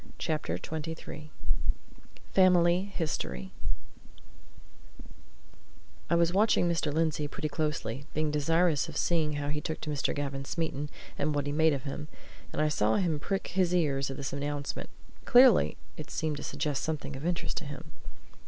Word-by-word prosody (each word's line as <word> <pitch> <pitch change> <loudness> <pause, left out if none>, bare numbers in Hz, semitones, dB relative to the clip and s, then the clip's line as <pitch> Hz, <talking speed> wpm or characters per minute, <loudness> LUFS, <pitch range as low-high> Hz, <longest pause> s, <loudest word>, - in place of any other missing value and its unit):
CHAPTER 155 -2 -1
XXIII 160 -1 -6 1.0
FAMILY 180 -1 +5
HISTORY 65 - -2 2.6
I - - +4
was 170 0 +3
watching 205 -3 +4
Mr. 165 -3 +1
Lindsey 155 -1 +1
pretty 155 +1 -3
closely, 145 -4 -2
being 155 0 +1
desirous 165 +1 +2
of 155 - -5
seeing 160 -3 +2
how 145 0 -2
he 150 0 -1
took 160 - -3
to 150 - -3
Mr. 145 -2 0
Gavin 140 -1 -2
Smeaton, 150 -1 -2 0.3
and 145 +1 +1
what 145 -1 0
he 145 - -1
made 160 +1 +4
of 135 -2 -3
him, 145 +1 -5 0.4
and - - 0
I - - +3
saw 110 -7 +2
him 165 -6 +1
prick 195 +6 -2
his 180 -2 +2
ears 140 -5 +1
at 135 - -5
this 135 -2 -4
announcement; 145 0 -3 0.4
clearly, 245 -4 +6 0.2
it 155 - -7
seemed 155 -2 -1
to - - -6
suggest 145 0 -1
something 145 -3 -3
of 135 - -7
interest 175 0 -1
to - - -2
him. 145 +2 -8
150 Hz, 155 wpm, -30 LUFS, 145-165 Hz, 2.6 s, clearly